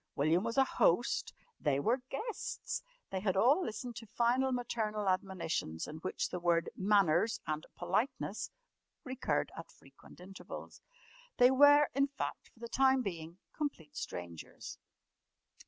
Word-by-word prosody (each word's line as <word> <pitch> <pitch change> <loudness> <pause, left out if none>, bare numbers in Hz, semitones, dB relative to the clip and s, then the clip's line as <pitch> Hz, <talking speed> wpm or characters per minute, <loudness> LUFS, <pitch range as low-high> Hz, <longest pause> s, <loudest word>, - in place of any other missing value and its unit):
William 160 +6 +2
was 230 +2 -3
a 270 - +7
"host," - - +2 0.3
they 140 -2 +1
were 235 - +1
"guests"; 460 - -4 0.3
they 190 - -1
had 190 -1 0
all 275 - +5
listened 235 -1 -5
to 230 -1 -8
final 245 +5 +2
maternal 220 -4 -2
admonitions 185 - -1
in 155 - -7
which 185 +4 -2
the 180 - -4
word 170 -1 +1
"manners" 200 0 +3
and 155 0 -3
"politeness" 190 +9 -1 0.5
recurred 260 -3 -1
at - - -8
frequent - - -18
intervals. 190 +2 -9 0.6
They 250 +1 +7
were, 290 +2 +7
in 275 +2 +3
fact, 280 - -5
for - - -26
the 235 - -5
time 265 +1 +3
being, 170 -4 -5 0.2
complete 165 - -4
strangers. 85 - -7
215 Hz, 140 wpm, -34 LUFS, 175-260 Hz, 0.6 s, a